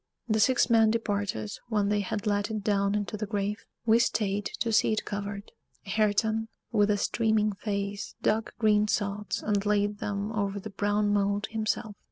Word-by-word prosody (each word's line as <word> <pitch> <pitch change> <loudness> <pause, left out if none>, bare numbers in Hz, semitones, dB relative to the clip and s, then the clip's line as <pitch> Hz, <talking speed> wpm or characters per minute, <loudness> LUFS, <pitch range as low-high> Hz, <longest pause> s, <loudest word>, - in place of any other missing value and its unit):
The 220 -1 +1
six 250 +4 +4
men 225 -2 +5
departed 205 - -1 0.2
when 205 -3 +1
they 210 0 +2
had 205 +1 -3
let 205 0 +1
it 215 -2 -3
down 200 -1 +1
into 210 0 -2
the 210 0 -3
grave: 205 0 -2 0.2
we 225 0 +5
stayed 205 -3 0
to 230 -1 0
see 220 - +4
it 215 - -2
covered. 205 0 -5 0.3
Hareton, 220 +2 +1 0.2
with 210 -3 +3
a 205 - +3
streaming 215 0 +1
face, 200 0 -4
dug 220 +1 +1
green 210 -2 +3
sods 205 0 -2
and 205 -2 +1
laid 205 0 +1
them 205 +1 -3
over 200 -2 -1
the 215 +2 -8
brown 205 +1 +1
mold 205 0 +1
himself. 215 -1 -2
210 Hz, 175 wpm, -28 LUFS, 200-215 Hz, 0.3 s, men